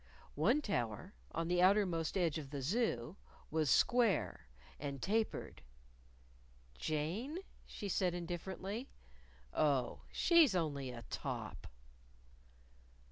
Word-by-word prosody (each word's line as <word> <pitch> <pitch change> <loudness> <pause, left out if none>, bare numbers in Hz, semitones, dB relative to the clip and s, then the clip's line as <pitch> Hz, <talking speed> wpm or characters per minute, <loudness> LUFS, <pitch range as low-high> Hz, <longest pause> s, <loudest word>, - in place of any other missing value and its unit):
One 235 - +3
tower, 125 - -2 0.2
on 165 0 -2
the 175 0 +2
outer 200 +3 +6
most 165 -1 -1
edge 165 -4 +1
of 140 -3 -8
the 140 -2 -4
Zoo, 170 - 0 0.3
was 155 -2 +1
square, 235 - +3 0.3
and 140 -1 -4
tapered. 220 +7 -1 1.2
"Jane?" 175 - -2 0.3
she 205 - -6
said 180 -2 +1
indifferently. 190 +7 -4 0.6
"Oh, 140 -4 +1
she's 330 - +5
only 145 -6 -1
a 120 -1 -7
top." - - -4
175 Hz, 105 wpm, -36 LUFS, 150-205 Hz, 1.2 s, outer